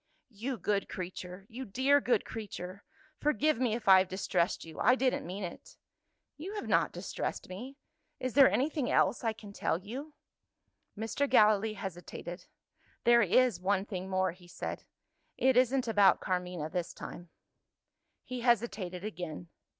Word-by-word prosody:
"You 240 +5 -4
good 200 +1 -1
creature! 185 +1 -6
you 245 +4 -7
dear 265 +6 +3
good 235 -5 +1
creature! 200 -3 -7 0.4
Forgive 300 -2 +2
me 240 -4 +1
if 235 - -7
I 190 -1 +9
have 185 - +1
distressed 185 -2 0
you; 160 -1 -10
I 250 +3 +5
didn't 260 -8 0
meant 190 +2 -4
it." 170 - -10 0.6
"You 370 +8 -6
have 415 - -4
not - - +3
distressed - - -4
me. 245 +10 -8 0.4
Is 255 -2 -3
there 275 -1 +8
anything 285 -1 0
else - - +2
I 225 - +2
can 210 -2 -11
tell 165 - 0
you?" 255 - -7 0.8
Mr. 225 +6 -1
Gallilee 215 -2 +4
hesitated. 175 -2 -7 0.6
"There 235 0 +6
is 225 -1 +3
one 195 +1 +1
thing 190 -3 -5
more," 185 -1 +1
he 175 +1 -17
said. 175 - -6 0.5
"It 260 -1 +3
isn't 255 +1 +3
about 205 -3 +5
Carmina 180 -4 -2
this 180 -1 -3
time 175 0 -9 0.5
" - - -53
He 255 0 -5
hesitated 210 -7 0
again. 175 -5 -6
210 Hz, 155 wpm, -31 LUFS, 185-250 Hz, 0.8 s, I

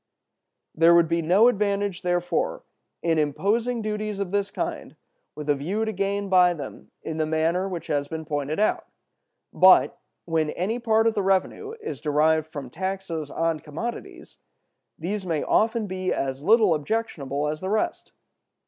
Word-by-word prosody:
"There 165 +1 +5
would 170 -1 +5
be 170 +1 0
no 185 +8 +5
advantage, 200 -4 0
therefore, 175 -1 -1 0.4
in 165 -2 +2
imposing 220 - 0
duties 210 -1 -3
of 195 -2 -3
this 200 0 0
kind - - -5 0.4
with 150 -1 -7
a 145 - +4
view 185 +11 -2
to 220 - -2
gain 200 0 -1
by 180 -2 +5
them 140 -4 -9
in 160 - -4
the 155 -1 0
manner 165 +4 0
which 175 -3 -5
has 145 -1 -1
been 160 +1 -6
pointed 145 +1 -2
out. 215 - +1 0.7
But, - - +6 0.3
when 160 -2 0
any 205 +10 -2
part 225 -2 +2
of 225 - +3
the 210 - 0
revenue 195 - 0
is 440 0 -6
derived 155 +1 +2
from 140 -5 -8
taxes 185 -4 -4
on 165 0 -1
commodities, 165 +12 -7 0.6
these 195 +5 -3
may 165 -5 -1
often 225 0 +2
be 185 -1 -3
as 135 0 -2
little 215 +1 +5
objectionable 150 - -2
as 155 +1 -3
the 190 - -3
rest. 215 +1 -1
180 Hz, 160 wpm, -25 LUFS, 155-205 Hz, 0.7 s, But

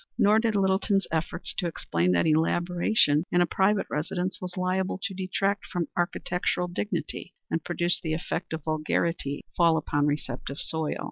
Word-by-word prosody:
Nor 210 +2 +5
did 225 -2 +1
Littleton's 195 0 +2
efforts 165 +2 -2
to 180 - 0
explain 90 - 0
that 85 - +3
elaboration 165 0 +3
in 175 - +3
a 175 - +5
private 195 +4 +2
residence 180 +5 -2
was 180 0 -6
liable 185 +1 0
to 200 - -2
detract 195 +2 -1
from 175 -4 -2
architectural 180 0 0
dignity 190 +5 -4 0.2
and 165 - +1
to - - -46
produce 175 0 0
the 160 -1 -1
effect 175 +1 -4
of 160 -2 -4
vulgarity 155 -1 -1
fall 170 -2 +4
upon 145 -1 +1
receptive 140 -2 -3
soil. 160 -1 -2
175 Hz, 160 wpm, -27 LUFS, 160-190 Hz, 0.2 s, Nor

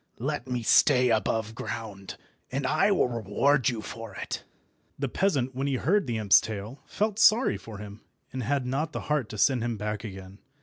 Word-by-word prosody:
Let 135 0 -3
me 125 -2 -2
stay 125 +1 +5
aboveground, 110 -2 -3 0.3
and 135 +1 -2
I 155 +9 +3
will 190 - +3
reward 125 +5 +1
you 115 -3 -4
for 115 -3 -8
it." - - -5 0.5
The 140 - -1
peasant, 135 -4 0
when 135 +2 -2
he 140 - 0
heard 170 +6 +1
the 115 -2 -1
imp's 105 -3 +6
tale, 110 +4 -6
felt 210 0 -1
sorry 220 +3 +5
for 110 -2 -10
him, 105 +1 -10 0.3
and 130 - -3
had 135 +2 -1
not 145 +5 -2
the - - -3
heart 150 -7 -1
to 105 - -7
send 125 +2 +3
him 120 -2 -2
back 105 +1 -4
again. 95 -2 -9
125 Hz, 185 wpm, -27 LUFS, 110-140 Hz, 0.5 s, imp's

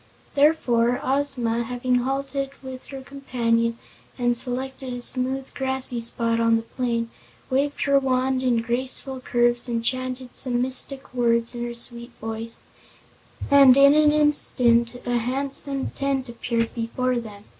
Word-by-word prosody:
Therefore 250 -5 +2
Ozma, 255 -4 0
having 250 +1 -1
halted 270 +2 -2
with 260 -1 -9
her 270 -1 -8
companion 230 -4 -1 0.4
and 240 -1 +1
selected 260 +2 -3
a 245 - -5
smooth, 260 +2 0
grassy 265 -2 -1
spot 230 0 +1
on 230 0 +3
the 225 - -4
plain, 235 -1 -3 0.4
waved 280 +2 0
her 280 -1 +4
wand 260 0 0
in 240 -3 +1
graceful 260 +2 -1
curves 240 0 +1
and 230 -1 -2
chanted 255 0 -3
some 245 -2 +1
mystic 260 +1 -3
words 235 -1 +1
in 240 0 -5
her 240 0 -5
sweet 235 +1 -2
voice, 225 +1 -4 0.9
and 275 -2 +7
in 280 +1 +7
an 300 0 +5
instant 250 -6 +3
a 245 -1 +1
handsome 275 +2 -1
tent 275 -2 -2
appeared 235 -1 -2
before 245 +2 -1
them. 210 -3 -10
250 Hz, 140 wpm, -23 LUFS, 235-270 Hz, 0.9 s, and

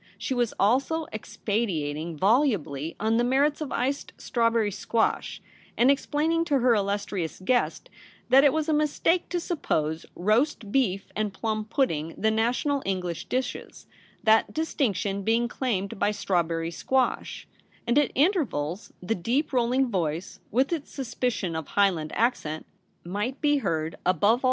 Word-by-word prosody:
She - - -3
was 240 -3 +1
also 275 +10 +2
expatiating 170 -8 -2
volubly 190 - +1
on 220 +2 +1
the 240 - +3
merits 280 +5 +2
of 300 - -4
iced 270 +4 -2
strawberry 230 -3 +1
squash, 225 +3 -1 0.3
and 250 +3 +6
explaining 310 +4 +1
to 290 -4 +2
her 250 -1 +4
illustrious 200 -4 -2
guest 245 - 0 0.4
that 265 +2 +7
it 285 - +6
was 315 +1 -1
a 315 - +2
mistake 305 +3 +1
to 350 - -1
suppose 160 - -2
roast 215 - +1
beef 200 -7 0
and 210 -1 -1
plum 215 +1 -2
pudding 165 - -1
the 220 +1 +2
national 245 +6 +1
English 180 -3 -3
dishes, 255 0 -4 0.4
that 220 0 +4
distinction 210 - -1
being 230 +4 +2
claimed 200 -7 -2
by 205 - +3
strawberry 170 -5 -1
squash; 260 +8 -1 0.4
and 240 +4 +3
at 290 - +1
intervals 250 - 0
the 185 - 0
deep 245 - -1
rolling 255 +2 +2
voice, 170 -2 -2
with 260 +8 +1
its 310 -4 -4
suspicion 235 - -2
of 160 -2 -4
Highland 180 -7 +1
accent, 190 -10 0 0.4
might 210 +9 -3
be 295 -1 +3
heard 165 - -1
above 185 0 +1
all 205 - +6
MARY'S - - +8
RECEPTION. 240 - +2
225 Hz, 150 wpm, -26 LUFS, 185-270 Hz, 0.4 s, MARY'S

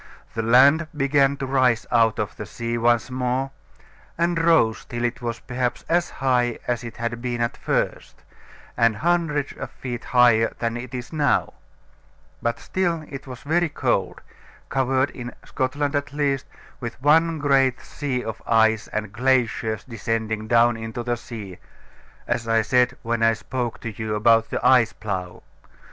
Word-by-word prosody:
The 115 - -1
land 135 +8 +5
began 140 0 +3
to 135 - -3
rise 130 -4 +2
out 115 -2 +3
of - - -3
the - - -7
sea 115 0 -4
once 120 +1 +2
more, 130 +1 -1 0.7
and 170 0 +1
rose 160 -10 +3
till 120 0 -4
it 120 +1 -2
was 120 -1 -4
perhaps 125 0 -3
as 175 +1 +1
high 125 -3 0
as 120 -1 -1
it 115 -2 -8
had 115 0 -3
been 120 -1 -3
at 115 0 -1
first, - - -2 0.5
and 115 -2 +3
hundreds 160 0 0
of - - -7
feet 120 -2 -6
higher 120 -3 +4
than 115 -1 -2
it 120 +1 -6
is 125 +4 -7
now: 150 -2 +1 0.9
but 115 0 -1
still 170 -4 -1
it 140 -1 -8
was 130 0 -8
very 170 +3 +1
cold, - - -1 0.5
covered, 135 0 +1
in 120 -1 -8
Scotland 145 +3 -1
at 145 0 -1
least, 140 -2 0 0.3
with 120 -1 -6
one 160 +4 +4
great 135 -3 +2
sea 130 -4 -4
of 110 -1 -6
ice 110 -1 +3
and 110 -2 -4
glaciers 115 -3 +1
descending 110 -2 -3
down 120 0 +4
into 110 +1 -5
the 120 0 0
sea, 110 -6 -9 0.7
as 115 - -2
I 115 -1 +3
said 125 +2 +2
when 115 0 -1
I 115 0 +5
spoke 120 +2 -4
to 115 - -4
you 110 -1 -3
about 115 +1 +4
the - - -3
Ice 120 -4 +5
Plough. 95 -4 -5
120 Hz, 160 wpm, -23 LUFS, 115-135 Hz, 0.9 s, land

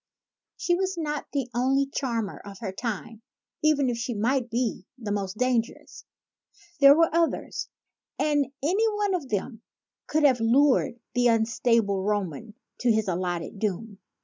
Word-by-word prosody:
She 350 - 0
was 375 +1 -1
not 300 -3 -3
the 275 -4 -1
only 265 +3 +2
charmer 235 -7 -3
of 200 -1 -11
her 195 -1 -5
time, 225 +1 -5 0.4
even 305 -3 +3
if 240 -2 -1
she 240 0 -3
might 240 +4 0
be 230 -5 -2
the 220 -5 -5
most 200 -1 -3
dangerous. 250 -1 -2 0.7
There 280 0 +9
were 330 -2 +3
others; 335 0 -1 0.5
and 295 -2 +1 0.2
any 400 +9 +2
one 410 -2 0
of 315 -8 -3
them 220 +2 -3 0.5
could 310 0 +1
have 260 -4 +5
lured 250 +1 +3
the 245 0 +3
unstable 225 -3 +2
Roman 205 0 -3 0.2
to 245 - +3
his 220 -1 +1
allotted 180 +2 -3
doom. 205 0 -3
240 Hz, 150 wpm, -26 LUFS, 210-280 Hz, 0.7 s, There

